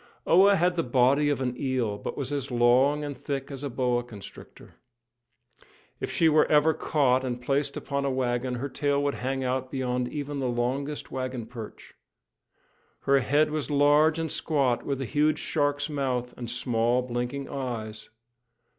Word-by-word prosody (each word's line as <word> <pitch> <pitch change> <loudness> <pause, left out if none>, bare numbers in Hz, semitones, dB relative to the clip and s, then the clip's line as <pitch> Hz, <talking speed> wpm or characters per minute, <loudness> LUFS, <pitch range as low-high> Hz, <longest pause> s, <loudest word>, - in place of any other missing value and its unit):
Oa 195 +4 +6
had 175 0 +1
the - - +3
body 135 +3 +3
of 145 -2 -1
an 125 -1 -1
eel, 130 -6 -1
but - - -6
was 140 0 -3
as 140 -1 -3
long 125 +4 +3
and 145 -1 -4
thick 135 +2 -5
as 135 0 -7
a 140 - -2
boa 125 -1 0
constrictor. 105 -5 -12 1.3
If - - -3
she 165 - +2
were 155 -1 +4
ever 150 +1 +4
caught, 130 -5 +1
and 125 -2 -3
placed 140 +3 -1
upon 140 0 -3
a 140 - 0
wagon, 125 -1 -1
her 130 +3 -3
tail 145 0 0
would 145 0 0
hang 135 +1 -3
out 130 0 -2
beyond 125 -2 -1
even 145 0 -4
the 130 -2 -1
longest 130 +5 -2
wagon 130 -3 -4
perch. 115 -2 -10 1.1
Her 140 0 +3
head 145 +4 +2
was 150 -4 -2
large 145 +2 +4
and 165 -1 -2
squat, 130 -6 0
with 140 -2 -2
a - - -2
huge 150 +6 +1
shark's 145 -2 0
mouth 130 -5 -2
and 120 -2 -6
small, 120 0 +1
blinking 125 +3 -3
eyes. 110 -5 -5
135 Hz, 170 wpm, -27 LUFS, 125-145 Hz, 1.3 s, Oa